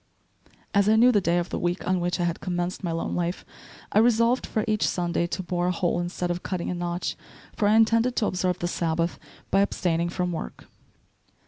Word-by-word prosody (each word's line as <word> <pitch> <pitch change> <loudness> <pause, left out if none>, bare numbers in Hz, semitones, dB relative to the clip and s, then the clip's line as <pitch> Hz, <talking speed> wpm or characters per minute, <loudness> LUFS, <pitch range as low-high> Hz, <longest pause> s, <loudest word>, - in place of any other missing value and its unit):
As 200 0 +4
I 220 - +5
knew 240 +3 +6
the 205 -4 +3
day 170 -1 +1
of 175 0 -1
the - - -3
week 175 +1 -2
on 185 0 +2
which 175 +1 -1
I - - +1
had 170 -1 -1
commenced 180 0 -3
my 175 - -1
lone 165 0 -2
life, 175 +1 -2 0.5
I 210 - +4
resolved, 235 +2 +3
for 215 - -1
each 215 -1 +1
Sunday, 170 -1 0
to 185 - -4
bore 175 0 -1
a - - +2
hole 175 0 0
instead 175 0 -2
of 175 +1 -3
cutting 180 -2 -3
a - - -1
notch, 175 0 -3 0.4
for 205 - +1
I 210 - +4
intended 230 +2 +3
to 215 - +1
observe 185 -2 0
the 175 - -2
Sabbath 165 -1 -1 0.3
by 195 - +4
abstaining 170 -4 0
from 180 0 -2
work. 160 - -6
180 Hz, 215 wpm, -25 LUFS, 175-205 Hz, 0.5 s, knew